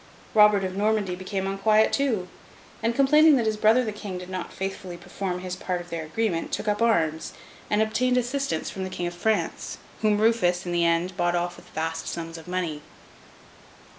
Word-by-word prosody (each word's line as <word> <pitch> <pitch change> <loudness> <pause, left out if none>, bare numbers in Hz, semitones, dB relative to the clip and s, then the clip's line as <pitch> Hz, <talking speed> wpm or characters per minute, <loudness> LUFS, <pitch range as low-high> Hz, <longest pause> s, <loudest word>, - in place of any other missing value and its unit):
Robert 210 -2 +6
of 185 0 -3
Normandy 205 -2 +1
became 190 +1 -3
unquiet 215 +3 +3
too; 235 -10 0 0.5
and, 230 +1 0
complaining 300 +3 +6
that 240 -4 +1
his 220 0 +1
brother 220 +4 +4
the 215 - -2
King 205 -3 -6
did 180 +1 -8
not 185 -1 -4
faithfully 190 -2 -5
perform 180 +1 -4
his 185 0 -4
part 185 -1 -3
of 175 0 -11
their 165 -1 -3
agreement, 170 +1 -1
took - - -3
up 210 +1 0
arms, 165 -9 +1 0.4
and 210 +1 +3
obtained 250 +3 +1
assistance 250 - -1
from 190 - -5
the 185 - -4
King 180 - -4
of 175 - -3
France, 215 +5 -1 0.2
whom 210 -1 +3
Rufus, 210 -6 +2
in 175 - -3
the 175 0 +2
end, 170 +2 +1
bought 175 0 +1
off 175 0 -1
with - - -16
vast 160 +1 -3
sums 165 0 -5
of 160 - -14
money. 175 -5 -2
190 Hz, 195 wpm, -25 LUFS, 175-220 Hz, 0.5 s, Robert